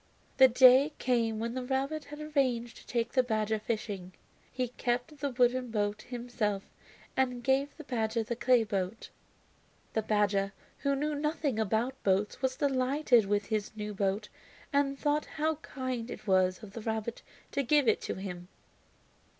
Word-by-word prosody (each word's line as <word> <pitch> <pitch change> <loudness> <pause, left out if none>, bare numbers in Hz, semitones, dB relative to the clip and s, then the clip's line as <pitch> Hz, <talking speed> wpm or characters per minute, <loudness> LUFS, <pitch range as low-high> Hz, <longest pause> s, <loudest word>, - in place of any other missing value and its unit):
The 265 -1 +9
day 260 +4 +6
came 230 -3 +1
when 230 +2 -2
the 255 0 -3
rabbit 275 +4 -1
had 295 +1 -9
arranged 255 -6 0
to - - -15
take 235 -1 -1
the 260 - +4
badger 220 -3 0
fishing. 205 -4 -4 0.4
He 250 -1 -2
kept 245 +4 -2
the 285 0 -1
wooden 250 0 +2
boat 210 -1 -1
himself 235 -5 -2 0.5
and 250 -2 0
gave 270 +3 +1
the 310 - -8
badger 225 -3 -1
the 235 +2 -3
clay 245 0 +4
boat. 200 0 -3 0.8
The 220 - +1
badger, 205 -2 +1 0.3
who 280 -1 +1
knew 300 +2 -1
nothing 295 -4 -1
about 225 +5 0
boats, 195 +2 +1
was 260 -1 0
delighted 260 -4 +3
with 205 0 +1
his 215 -1 -2
new 210 -1 -4
boat 195 +1 -1 0.5
and 280 -1 +2
thought 295 +1 +1
how 310 0 +1
kind 255 -5 -4
it - - -8
was 185 0 +2
of 200 -2 -10
the 230 - -6
rabbit 220 +1 -3 0.3
to 280 - 0
give 280 0 +3
it 220 - +3
to - - -3
him. 180 -2 -6
240 Hz, 165 wpm, -31 LUFS, 215-265 Hz, 0.8 s, The